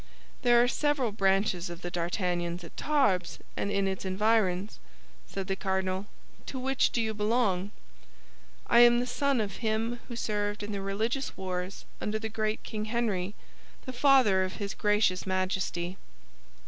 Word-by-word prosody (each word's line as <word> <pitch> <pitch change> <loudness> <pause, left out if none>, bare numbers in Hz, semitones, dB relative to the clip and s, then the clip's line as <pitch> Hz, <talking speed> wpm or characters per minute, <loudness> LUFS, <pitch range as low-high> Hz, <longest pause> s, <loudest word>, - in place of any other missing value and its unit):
"There 240 -2 +5
are - - +3
several 280 -3 +1
branches 195 -3 +1
of 170 +1 -8
the 175 - -4
D'Artagnans 175 0 -1
at 165 - -11
Tarbes 260 - +1 0.2
and - - -1
in 200 -1 +1
its 190 -1 -3
environs," 195 0 +1 0.5
said 195 - -4
the 195 0 -1
cardinal; 190 0 -1 0.4
"to 265 - -5
which 265 +1 +2
do - - -1
you 220 -1 0
belong?" 210 -3 +1 1.0
"I 235 - +5
am 240 0 +7
the 245 - 0
son 270 +1 +1
of 205 -4 -2
him 225 +1 -1
who 240 - -6
served 210 -2 -2
in 205 - -4
the 200 -1 -3
Religious 220 +8 -2
Wars 185 0 -4 0.2
under 215 +1 -1
the 220 0 -4
great 215 0 -2
King 215 -1 -4
Henry, 215 -4 -1 0.5
the 255 - -5
father 250 -7 +5
of 185 0 -3
his 200 -1 -4
gracious 210 -3 +1
Majesty." 185 -1 -1
205 Hz, 160 wpm, -29 LUFS, 185-235 Hz, 1.0 s, am